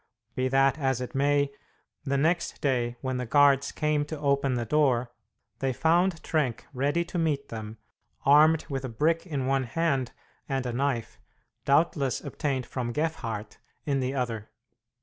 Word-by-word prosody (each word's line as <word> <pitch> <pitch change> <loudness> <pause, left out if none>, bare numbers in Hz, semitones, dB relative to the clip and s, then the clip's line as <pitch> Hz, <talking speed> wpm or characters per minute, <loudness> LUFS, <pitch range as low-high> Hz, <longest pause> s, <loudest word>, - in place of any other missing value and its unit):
Be 130 0 0
that 135 +2 +3
as 130 -3 +1
it 125 - -5
may, 140 +1 +2 0.5
the 140 -1 0
next 170 +4 0
day, 120 -4 0
when 130 -1 -2
the 125 - -3
guards 140 +1 +4
came 150 -1 0
to 155 +1 -6
open 140 -2 +1
the 120 -1 -2
door, 125 -2 +2 0.5
they 135 -1 0
found 170 +4 +2
Trenck 145 -8 -1
ready 145 +6 0
to 175 +1 -4
meet 145 -4 -1
them, 110 -1 -7 0.5
armed 150 +3 +6
with 135 -3 -3
a 130 - -4
brick 160 +9 0
in 140 -6 -2
one 135 0 +1
hand, 135 -1 0 0.4
and 135 -2 -1
a 120 - -2
knife, 130 -2 -2 0.5
doubtless 140 -2 +2
obtained 135 -5 -3
from 120 -1 -3
Gefhardt, 115 -9 -3 0.3
in 140 -2 +1
the 130 +1 -2
other. 115 -5 -3
135 Hz, 160 wpm, -27 LUFS, 125-150 Hz, 0.5 s, armed